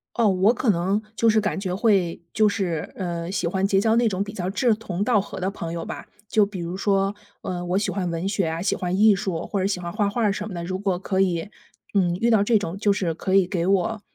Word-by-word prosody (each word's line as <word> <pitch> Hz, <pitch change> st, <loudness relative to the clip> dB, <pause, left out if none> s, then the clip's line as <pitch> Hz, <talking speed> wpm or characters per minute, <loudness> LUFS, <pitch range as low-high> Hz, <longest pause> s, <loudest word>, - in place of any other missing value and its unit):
哦， 230 Hz, -2 st, +3 dB
我 195 Hz, +4 st, +4 dB
可 245 Hz, -1 st, -1 dB
能 190 Hz, +4 st, 0 dB
就 230 Hz, -, +3 dB
是 220 Hz, 0 st, +4 dB
感 210 Hz, -2 st, -1 dB
觉 185 Hz, -2 st, -3 dB
会 195 Hz, -4 st, +2 dB
就 215 Hz, 0 st, +4 dB
是， 180 Hz, -7 st, -2 dB
呃， 170 Hz, -2 st, -4 dB
喜 185 Hz, -, -1 dB
欢 190 Hz, +2 st, 0 dB
结 195 Hz, -1 st, +3 dB
交 220 Hz, +2 st, +3 dB
那 235 Hz, 0 st, +3 dB
种 190 Hz, 0 st, -1 dB
比 205 Hz, +1 st, -8 dB
较 185 Hz, -3 st, -3 dB
志 225 Hz, +4 st, +2 dB
同 200 Hz, -3 st, -3 dB
道 215 Hz, -4 st, +3 dB
合 -, -, -8 dB
的 185 Hz, +1 st, -1 dB
朋 170 Hz, -4 st, -6 dB
友 170 Hz, -1 st, -4 dB
吧。 -, -, -7 dB, 0.2 s
就 210 Hz, 0 st, +3 dB
比 200 Hz, -2 st, -7 dB
如 170 Hz, +1 st, -4 dB
说， 195 Hz, 0 st, +1 dB, 0.3 s
呃， 175 Hz, -1 st, -4 dB
我 180 Hz, +2 st, 0 dB
喜 205 Hz, 0 st, 0 dB
欢 185 Hz, -1 st, -2 dB
文 170 Hz, +2 st, -2 dB
学 195 Hz, -3 st, 0 dB
啊， 160 Hz, +1 st, -3 dB
喜 195 Hz, -, +1 dB
欢 180 Hz, -1 st, -2 dB
艺 210 Hz, 0 st, +6 dB
术 185 Hz, -4 st, -3 dB
或 200 Hz, -, -2 dB
者 185 Hz, -, 0 dB
喜 195 Hz, -2 st, -1 dB
欢 175 Hz, -1 st, -5 dB
画 205 Hz, 0 st, 0 dB
画 235 Hz, +3 st, -2 dB
儿 205 Hz, -2 st, +3 dB
什 210 Hz, +1 st, -4 dB
么 205 Hz, -, -7 dB
的， 170 Hz, -, -4 dB
如 185 Hz, +2 st, -3 dB
果 190 Hz, -2 st, -1 dB
可 190 Hz, -1 st, -2 dB
以， 180 Hz, +1 st, 0 dB, 0.4 s
嗯， 175 Hz, -3 st, +2 dB
遇 230 Hz, +5 st, +1 dB
到 220 Hz, -3 st, +4 dB
这 225 Hz, +1 st, +3 dB
种 190 Hz, -3 st, -4 dB
就 205 Hz, 0 st, +2 dB
是 180 Hz, -5 st, -1 dB
可 190 Hz, -, -2 dB
以 195 Hz, -2 st, +5 dB
给 175 Hz, -2 st, -1 dB
我， 195 Hz, +3 st, +1 dB
195 Hz, 290 characters per minute, -24 LUFS, 180-210 Hz, 0.4 s, 艺